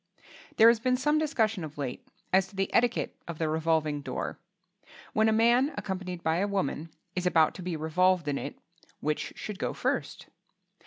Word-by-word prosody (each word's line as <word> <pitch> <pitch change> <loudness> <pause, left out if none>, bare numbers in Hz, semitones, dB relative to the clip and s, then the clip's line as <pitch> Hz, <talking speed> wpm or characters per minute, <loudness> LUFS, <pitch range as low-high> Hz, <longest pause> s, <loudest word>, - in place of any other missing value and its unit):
There 225 +1 +9
has 235 -1 +3
been 255 +2 +1
some 295 +4 +2
discussion 225 - 0
of 150 -1 -8
late 135 -4 -5 0.3
as 190 0 +4
to 205 - -17
the 195 0 -1
etiquette 240 -1 +2
of 170 -2 -5
the 160 - 0
revolving 155 -2 0
door. 130 -2 -4 0.7
When 220 0 +4
a - - +3
man 240 +6 +3
accompanied 185 -3 -4
by 160 +1 +2
a 200 +3 +1
woman 165 -5 -2 0.3
is 180 0 0
about 160 -3 +4
to - - -9
be 180 -1 -3
revolved 170 +2 +2
in 140 -1 0
it, 140 - -6 0.4
which 150 0 -2
should 210 -3 -6
go - - -1
first? - - -2
185 Hz, 180 wpm, -29 LUFS, 160-220 Hz, 0.7 s, There